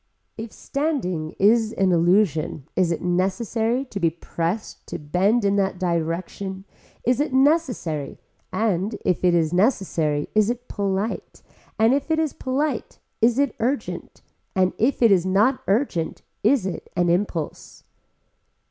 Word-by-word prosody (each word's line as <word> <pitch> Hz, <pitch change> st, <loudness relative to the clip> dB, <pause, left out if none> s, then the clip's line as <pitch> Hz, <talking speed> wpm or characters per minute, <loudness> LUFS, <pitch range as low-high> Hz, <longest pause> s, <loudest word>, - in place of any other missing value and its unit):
If 225 Hz, 0 st, -7 dB
standing 225 Hz, -, -2 dB
is 220 Hz, +2 st, +3 dB
an 190 Hz, -1 st, +2 dB
illusion 170 Hz, -4 st, +2 dB
is 180 Hz, -2 st, +2 dB
it 170 Hz, -, -2 dB
necessary 220 Hz, +7 st, 0 dB
to 210 Hz, -6 st, -6 dB
be 170 Hz, -3 st, +3 dB
pressed 170 Hz, +4 st, -4 dB
to -, -, -5 dB
bend 195 Hz, +9 st, +1 dB
in 200 Hz, 0 st, +2 dB
that 190 Hz, -2 st, 0 dB
direction 180 Hz, +3 st, -2 dB, 0.4 s
is 250 Hz, +2 st, +2 dB
it 295 Hz, -2 st, 0 dB
necessary 260 Hz, -, +1 dB, 0.3 s
and 200 Hz, +1 st, 0 dB
if 180 Hz, -, +1 dB
it 175 Hz, -1 st, +4 dB
is 165 Hz, -1 st, +1 dB
necessary 175 Hz, -, +1 dB
is 215 Hz, 0 st, +3 dB
it 245 Hz, +1 st, -4 dB
polite 200 Hz, +1 st, -3 dB, 0.3 s
and 225 Hz, +3 st, +4 dB
if 280 Hz, +3 st, -1 dB
it 320 Hz, -, +2 dB
is 315 Hz, -2 st, 0 dB
polite 265 Hz, -1 st, -2 dB, 0.2 s
is 235 Hz, +2 st, +4 dB
it 280 Hz, -1 st, +1 dB
urgent 260 Hz, +5 st, -3 dB, 0.3 s
and 185 Hz, -1 st, +2 dB
if 245 Hz, +2 st, +2 dB
it 230 Hz, -, +6 dB
is 185 Hz, -3 st, +4 dB
not 205 Hz, +8 st, +2 dB
urgent 195 Hz, -, 0 dB, 0.2 s
is 230 Hz, -1 st, +3 dB
it 190 Hz, -, -5 dB
an 175 Hz, 0 st, +2 dB
impulse. 170 Hz, -2 st, -2 dB
200 Hz, 145 wpm, -23 LUFS, 175-240 Hz, 0.4 s, it